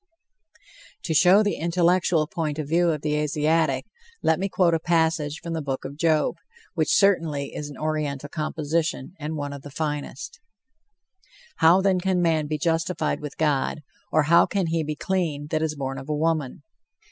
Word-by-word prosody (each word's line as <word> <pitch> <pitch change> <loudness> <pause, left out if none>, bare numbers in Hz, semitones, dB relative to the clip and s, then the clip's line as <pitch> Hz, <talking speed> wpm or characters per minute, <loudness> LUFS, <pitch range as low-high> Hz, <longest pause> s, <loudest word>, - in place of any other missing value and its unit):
To 160 - -1
show 190 +6 +6
the 205 - -1
intellectual 170 -1 +2
point 155 -1 -3
of 155 -3 -3
view 170 +3 +2
of 155 -3 -1
the 150 -1 0
Asiatic, 150 -2 +1 0.4
let 160 +1 +2
me 195 +1 -1
quote 180 -3 +2
a 165 - +2
passage 160 -2 0
from 170 - -4
the 160 - -2
Book 135 -2 -4
of 135 +1 -6
Job, 155 0 +1 0.4
which 160 -3 0
certainly 165 -8 +2
is 150 -1 -5
an 145 - -10
Oriental 150 -2 -2
composition, 155 +1 -2
and 155 +1 -4
one 145 -1 -4
of 140 - -8
the 145 - -10
finest: 150 -2 -5 1.2
"How, 170 +4 +5
then, 190 -1 +2
can 185 0 0
man 160 -3 +1
be 155 +1 -2
justified 165 +1 -1
with 150 -2 -8
God, 150 0 0 0.3
or 155 - +3
how 170 +3 +5
can 195 -3 -1
he 165 -1 0
be 155 0 -3
clean 165 -5 -2
that 155 -1 0
is 155 -1 -1
born 135 -1 -4
of 135 +2 -10
a 150 - 0
woman? 155 -3 -1
155 Hz, 180 wpm, -24 LUFS, 150-170 Hz, 1.2 s, show